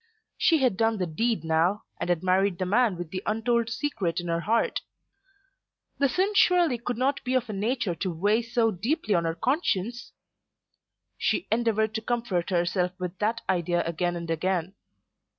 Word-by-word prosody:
She 330 - +3
had 240 -7 +2
done 225 0 +2
the 185 - -1
deed 205 +3 -1
now, 165 +5 +1 0.2
and - - -3
had 175 -1 +1
married 185 0 +2
the 185 - -1
man 210 0 +2
with 175 -2 -6
the 185 - -3
untold 230 +1 +1
secret 225 - -2
in 175 -1 -5
her 165 0 +1
heart. 225 +6 0 1.2
The 280 -1 +3
sin 385 +8 +1
surely 350 - +4
could 240 0 -3
not 270 +3 0
be 255 0 -1
of 250 -1 +1
a - - -5
nature 220 0 -1
to 185 +2 -3
weigh 205 +7 +2
so 230 -1 +1
deeply 220 - -1
on 170 -2 +2
her 165 0 -1
conscience! 240 - -1 1.1
She - - 0
endeavoured 220 -1 +1
to 220 - -2
comfort 225 -7 -1
herself 180 0 0
with 180 0 -5
that 225 +2 0
idea 175 -1 +1
again 175 +1 -1
and 170 -1 -4
again. 180 +2 -1
210 Hz, 175 wpm, -27 LUFS, 175-235 Hz, 1.2 s, surely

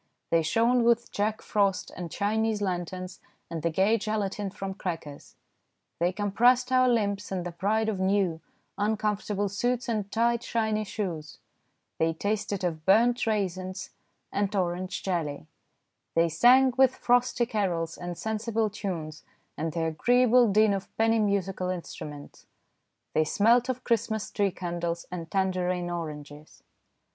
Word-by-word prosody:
They 165 - +4
shone 230 +9 +2
with 235 0 +2
Jack 215 +1 -1
Frost 200 -3 0
and 175 -2 -5
Chinese 215 +3 0
lanterns 185 -1 -4 0.3
and 165 -1 -3
the 170 - +1
gay 195 +7 +2
gelatine 205 -1 -2
from 195 0 -5
crackers; 165 -7 -6 0.6
they 175 +2 +2
compressed 240 +6 +2
our 255 0 +5
limbs 205 -4 0
in 185 -2 -2
the 175 - -5
pride 215 +6 0
of 210 -4 -1
new, 190 -4 +1 0.4
uncomfortable 210 -1 0
suits 245 +6 -1
and 210 -4 -2
tight, 235 +1 +2
shiny 220 -2 -1
shoes; 170 -8 -5 0.6
they 165 0 +2
tasted 205 +2 -2
of 160 -3 -2
burnt 230 +7 +4
raisins 185 -3 -2 0.4
and 200 +1 -1
orange 180 0 -2
jelly; 160 - -2 0.7
they 165 0 +4
sang 250 +9 +5
with 260 -1 +5
frosty 245 0 +2
carols 185 -8 -1
and 175 -1 -6
sensible 220 0 -1
tunes 165 -7 -5 0.3
and 160 +1 -3
the 165 - -1
agreeable 240 +8 +4
din 215 0 +4
of 195 -1 -4
penny 225 0 +3
musical 195 -3 0
instruments; 150 -5 -7 0.7
they 155 - +3
smelt 230 +9 +3
of 255 0 -2
Christmas 220 -2 -1
tree 200 -1 +1
candles 170 -2 -4
and 170 -2 -6
tangerine 180 -2 0
oranges. 150 -3 -7
200 Hz, 135 wpm, -27 LUFS, 175-220 Hz, 0.7 s, our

